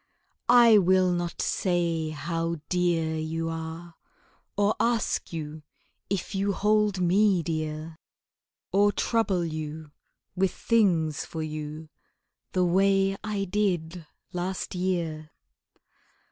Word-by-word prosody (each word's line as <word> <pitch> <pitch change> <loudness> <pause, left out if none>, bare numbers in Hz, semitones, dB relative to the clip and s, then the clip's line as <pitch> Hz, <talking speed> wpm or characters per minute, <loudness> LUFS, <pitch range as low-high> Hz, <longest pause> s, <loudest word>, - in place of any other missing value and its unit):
I 235 -3 +8
will 185 0 +3
not 175 -1 -2
say 170 -3 0
how 165 +2 -2
dear 170 -3 +1
you 165 +1 -2
are, 165 +1 -6 0.6
Or 205 +1 +2
ask 235 -2 0
you 155 -2 -6 0.5
if 195 +1 -2
you 200 +1 0
hold 210 -1 +2
me 185 0 +3
dear, 155 0 -4 0.7
Or 205 +1 +4
trouble 205 -5 0
you 155 -1 -6 0.4
with 190 0 +2
things 170 -10 +2
for 160 -1 -5
you 155 0 -6 0.6
The 185 -1 +2
way 195 +2 +3
I 210 -2 -2
did 180 -4 -1 0.3
last 180 +1 -3
year. 170 -4 -2
175 Hz, 105 wpm, -27 LUFS, 160-195 Hz, 0.7 s, I